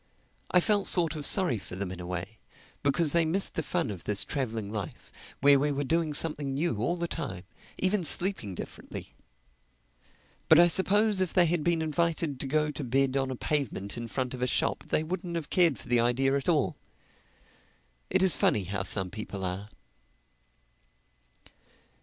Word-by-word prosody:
I 180 - +4
felt 205 +2 +2
sort 170 -3 +3
of 150 -2 +1
sorry 175 - +4
for 90 - -10
them 95 -1 -4
in 95 - -8
a 90 - -7
way, 90 +5 -6 0.4
because 145 +2 +1
they 170 +1 +2
missed 175 +5 0
the - - -2
fun 140 - -2
of 95 -4 -9
this 105 0 +1
traveling 115 -7 -4
life, 105 -6 -7 0.3
where 140 0 +6
we 145 +1 0
were 145 0 -2
doing 160 +1 0
something 145 -3 +1
new 155 -4 -1
all 120 +11 -1
the 170 -1 -3
time—even 165 - -4
sleeping 170 - +1
differently. - - -9 1.4
But 160 - +7
I 175 0 +6
suppose 200 +3 +2
if 185 - -2
they 180 -2 +5
had 170 -1 0
been 170 -1 +1
invited 160 -2 -1
to 135 - -4
go 150 +2 0
to 150 - -6
bed 135 +1 0
on 135 -1 0
a 130 - -4
pavement 125 -8 -3
in 120 -1 -6
front 130 +1 -3
of 125 - -7
a 125 - +1
shop - - -1
they 155 - 0
wouldn't 175 +1 -5
have 160 -3 -5
cared 170 -8 +3
for - - -11
the 120 0 +2
idea 130 +3 +1
at 140 +4 -2
all. 155 -5 +1 1.3
It - - +2
is 185 -4 +7
funny 105 -7 +1
how 95 +1 -4
some 95 -1 +6
people 100 -3 -6
are. 95 +3 -5
145 Hz, 180 wpm, -28 LUFS, 115-170 Hz, 1.4 s, But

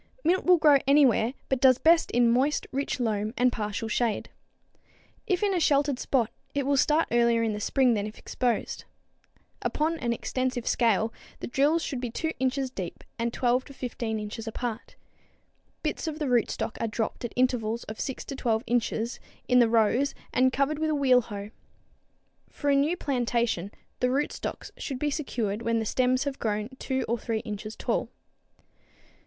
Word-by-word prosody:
Mint 365 +3 +2
will 360 -1 +6
grow 300 -3 +6
anywhere 270 -4 +4
but 265 -2 0
does 255 -2 +6
best 330 +3 +4
in 245 - +2
a 235 - +5
moist, 265 +5 +2
rich 275 0 -2
loam 215 -1 -1
and 250 +1 +4
partial 215 0 -3
shade. 225 0 -1 1.0
If 370 -2 +1
in 400 -1 +2
a 360 - +1
sheltered 285 -4 +2
spot, 240 -5 +1 0.2
it 280 -2 0
will 280 +1 +2
start 300 +4 +3
earlier 235 -1 +3
in 220 -2 0
the 210 - -4
spring 250 +3 +3
than 210 -1 -1
if 215 - -10
exposed. 245 -2 -2 0.8
Upon 320 +2 0
an 240 -3 -1
extensive 255 +1 -2
scale 225 -1 +2 0.3
the - - -5
drills 295 +6 +2
should 265 -4 -3
be 245 - -2
2 320 +7 -2
inches 260 0 0
deep 185 -7 -6 0.2
and 235 0 0
12 250 +1 +1
to 280 - -12
15 235 -3 -3
inches 210 +2 -6
apart. 230 +1 -5 0.9
Bits - - -2
of 310 -1 -3
the 305 - -2
rootstocks 240 -2 0
are 230 - +1
dropped 220 +2 -3
at 240 - -4
intervals 235 -3 +1
of 215 - -8
6 265 - -4
to 275 - -6
12 230 -4 0
inches 235 0 -1 0.3
in 250 0 +5
the 235 -2 +5
rows 235 +5 +2 0.2
and 260 +1 +4
covered 280 +3 0
with 315 0 0
a 305 - +1
wheel 260 -3 +4
hoe. 205 -2 -7 1.0
For 290 -1 -1
a - - +4
new 295 +6 +2
plantation 235 - 0 0.3
the 250 - +2
rootstocks 280 +3 -3
should 270 - -4
be 295 +2 -1
secured 230 -8 -2
when 230 0 +1
the 220 - -1
stems 255 +3 +2
have 280 -1 -4
grown 215 0 -1
2 265 -1 -1
or 235 +1 0
3 225 -1 -2
inches 215 0 -6
tall. - - -1
250 Hz, 180 wpm, -27 LUFS, 225-275 Hz, 1.0 s, will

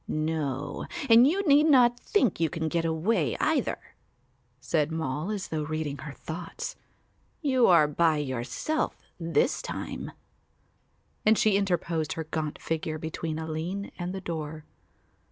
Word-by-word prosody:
"No, 155 -3 -2 0.2
and 235 +3 +9
you 380 +7 +1
need 295 +2 +6
not 245 -4 +5
think 255 - +1
you 165 -1 +2
can 160 0 -2
get 165 +1 0
away 165 +8 +1
either," - - +1 0.8
said 155 -1 0
Moll, 160 +2 -2
as 205 -3 -3
though 155 -1 -2
reading 150 -2 -3
her 150 -1 -7
thoughts. 170 - -6 0.7
"You 260 -4 +4
are 170 -4 +6
by 155 +1 +2
yourself 140 - -2 0.2
this 165 - +1
time," - - -5 1.1
and 215 0 +5
she 215 -2 +3
interposed 175 -5 0
her 160 - -4
gaunt 155 -1 -4
figure 160 -1 -2
between 160 0 -4
Aline 160 +5 -4
and 175 +1 -3
the 190 0 -5
door. 155 -3 -5
160 Hz, 135 wpm, -28 LUFS, 155-200 Hz, 1.1 s, and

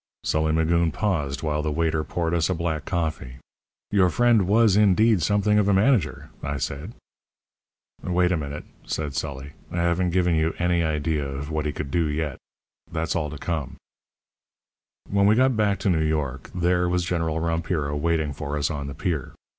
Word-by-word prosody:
Sully 80 0 +1
Magoon 80 +1 +2
paused 75 -9 -1
while 75 -1 0
the 75 0 -2
waiter 80 0 0
poured 85 +1 -2
us 85 -1 +1
a 90 - +1
black 80 -2 -2
coffee. 80 -8 -3 0.6
"Your 95 -3 +4
friend 115 +1 +3
was, 110 0 +4
indeed, 105 0 +4
something 105 +4 +2
of 100 - +2
a 100 - +4
manager," 105 - +1
I 70 0 -3
said. 75 - -5 1.1
"Wait 90 0 +1
a - - +3
minute," 75 -2 -5 0.2
said 75 -3 -3
Sully, 70 -1 -4 0.2
"I - - -5
haven't 85 +1 +1
given 90 0 +2
you 80 0 +1
any 85 -1 +1
idea 75 -1 0
of 70 +2 -5
what 75 -1 -1
he - - -1
could 70 -2 -5
do 85 0 +1
yet. 75 -1 -3 0.5
That's 80 0 -2
all 80 -3 -1
to 75 - -7
come. 80 -2 -3 1.3
"When 100 0 +3
we 105 - +5
got 130 +1 +3
back 105 -2 +2
to 100 - +1
New 80 -2 +1
York 70 -5 -2
there 90 0 +1
was 90 0 0
General 80 -2 -1
Rompiro 80 -3 -1
waiting 80 -1 0
for 75 0 -4
us 70 -1 0
on 70 -2 -4
the 70 - -6
pier. 80 -8 -3
80 Hz, 180 wpm, -24 LUFS, 75-90 Hz, 1.3 s, we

